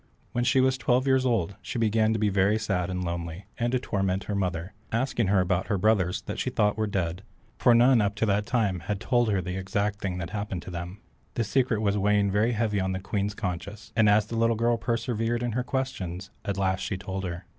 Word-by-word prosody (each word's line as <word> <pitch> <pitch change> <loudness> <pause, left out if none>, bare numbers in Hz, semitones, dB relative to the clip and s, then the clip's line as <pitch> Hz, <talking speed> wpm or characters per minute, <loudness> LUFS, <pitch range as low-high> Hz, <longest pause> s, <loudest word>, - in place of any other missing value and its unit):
When 120 - 0
she 130 +1 +4
was 130 0 +2
twelve 125 +2 +2
years 130 -1 +3
old 100 -6 0
she - - -5
began 110 -1 +2
to 110 - +1
be 105 -1 +2
very 100 +2 +3
sad 95 -5 -1
and 90 0 -2
lonely, 85 +1 -4
and 120 0 +1
to 130 - +2
torment 95 -5 -1
her 105 - -4
mother, 90 -1 -2 0.2
asking 120 -2 0
her 95 -1 +4
about 90 0 0
her 100 - +1
brothers 100 -2 +2
that - - -5
she - - 0
thought 105 -4 +1
were 110 0 -1
dead, 90 -2 -2 0.4
for 120 - +5
none 120 0 +6
up 100 0 0
to 110 - +1
that 105 0 +1
time 105 -8 0
ever 105 - -1
told 120 +3 +1
her 95 -3 +1
the 90 +2 -4
exact 100 +2 -1
thing 95 -2 -2
that 85 0 -5
happened 100 -4 -4
them. 90 +3 -7 0.3
The 115 - +1
secret 115 -1 +1
was 100 -1 +1
weighing 100 0 +2
very 110 +4 +2
heavy 105 -2 0
on 95 0 -1
the 95 - -2
Queen's 100 +1 -2
conscience, 100 +3 -5
and 110 -2 +5
as 105 0 +4
the 115 - -6
little 115 0 +2
girl 115 +1 +2
persevered 115 0 -1
in 120 - -1
her 125 +3 -1
questions, 100 -9 -3
at 100 -1 -2
last 95 -1 +1
she 95 0 -3
told 95 0 -5
her. 85 0 -5
105 Hz, 230 wpm, -27 LUFS, 95-115 Hz, 0.4 s, none